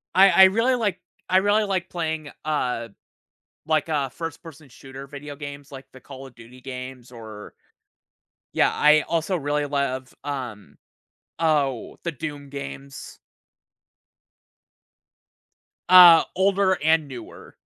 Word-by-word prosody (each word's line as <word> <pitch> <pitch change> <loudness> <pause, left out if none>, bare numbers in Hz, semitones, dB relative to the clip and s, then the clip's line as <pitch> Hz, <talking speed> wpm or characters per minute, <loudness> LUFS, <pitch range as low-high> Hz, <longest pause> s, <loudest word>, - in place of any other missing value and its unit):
I 195 +1 +7
I 190 +1 +7
really 230 +7 +2
like, 205 -6 -2 0.3
I 185 - +4
really 205 +3 +3
like 190 -4 -2
playing, 160 -3 -4 0.2
uh, 125 -6 -2 0.8
like, 155 0 0
uh, 140 -3 0
first-person 160 0 -9
shooter 135 +3 -11
video 145 0 -9
games 145 -1 -9
like 135 -1 -10
the 130 - -14
Call 135 0 -11
of 130 - -16
Duty 120 +2 -15
games 130 -1 -9
or 110 -3 -11 1.0
Yeah, - - +3
I 150 0 +4
also 165 +3 -1
really 145 -2 -1
love, 135 -2 -3
um, 125 -8 -7 0.6
oh, 145 -7 0
the 170 - -2
Doom 145 -2 -7
games. 140 0 -9 2.7
Uh, 175 -3 +9
older 195 0 +2
and 160 -1 +2
newer. 130 -3 -11
145 Hz, 120 wpm, -23 LUFS, 135-170 Hz, 2.7 s, Uh